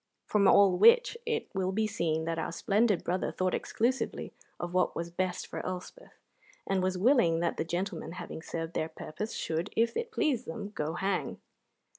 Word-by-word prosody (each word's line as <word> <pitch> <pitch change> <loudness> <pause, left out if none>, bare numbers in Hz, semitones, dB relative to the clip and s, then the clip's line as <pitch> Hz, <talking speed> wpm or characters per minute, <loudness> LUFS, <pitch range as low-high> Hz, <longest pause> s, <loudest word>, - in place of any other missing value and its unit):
From 200 -2 +3
all 190 -3 +6
which 470 +1 +6
it 455 -1 -1
will 190 -1 0
be 215 +3 +1
seen 160 -6 -1
that 165 0 -2
our 160 - -2
splendid 205 +3 +2
brother 180 +2 -1
thought 185 0 -1
exclusively 250 +4 -1 0.3
of 175 0 -4
what 185 0 +2
was 170 0 -4
best 180 +1 -2
for - - -6
Elspeth, 185 - -7 0.5
and 195 -1 +1
was 185 0 0
willing 185 -6 +4
that 170 - 0
the - - 0
gentlemen, 175 +2 -3
having 170 - -7
served 165 0 -5
their 155 - -1
purpose, 210 +9 -6
should, 165 +5 -2
if 230 +1 +2
it 470 0 -3
pleased 295 - 0
them, 200 +5 -5
go 155 -2 -2
hang. 195 0 -1
185 Hz, 180 wpm, -30 LUFS, 170-215 Hz, 0.5 s, all